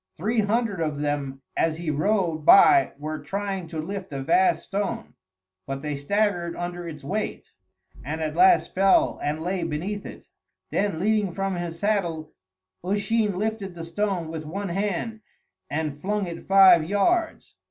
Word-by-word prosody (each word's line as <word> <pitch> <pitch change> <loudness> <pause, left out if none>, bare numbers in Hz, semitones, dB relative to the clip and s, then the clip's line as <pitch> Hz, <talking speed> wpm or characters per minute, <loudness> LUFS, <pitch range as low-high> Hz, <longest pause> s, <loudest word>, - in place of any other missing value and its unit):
Three 220 +7 0
hundred 210 -3 0
of 150 -2 -2
them 140 -2 -3
as 160 -1 +1
he 165 -2 -2
rode 170 +1 +1
by 345 - +7
were 155 +1 -5
trying 195 -3 -4
to 160 -1 -6
lift 195 +3 -5
a 135 -1 -4
vast 360 - +3
stone, 200 0 -3 0.5
but 135 +1 -5
they 150 -1 -2
staggered 175 +3 0
under 175 0 -5
its 150 -3 -8
weight, 205 +9 -4 0.5
and 155 +5 -4
at 155 -1 -3
last 370 -1 +4
fell 195 +1 +3
and 155 +2 -2
lay 180 +1 -1
beneath 170 +6 -3
it; - - -10 0.5
then 195 -5 0
leaning 210 0 +1
from 195 +2 -2
his 175 -1 -4
saddle 170 -6 -1 0.5
Usheen 205 +1 0
lifted 210 -3 -3
the 165 - -7
stone 175 0 -2
with 160 -1 -5
one 195 +6 -5
hand 205 +4 -2 0.5
and 150 -1 -3
flung 205 +1 -1
it 170 -1 -8
five 190 -4 +7
yards. 320 - 0
180 Hz, 155 wpm, -25 LUFS, 160-205 Hz, 0.5 s, by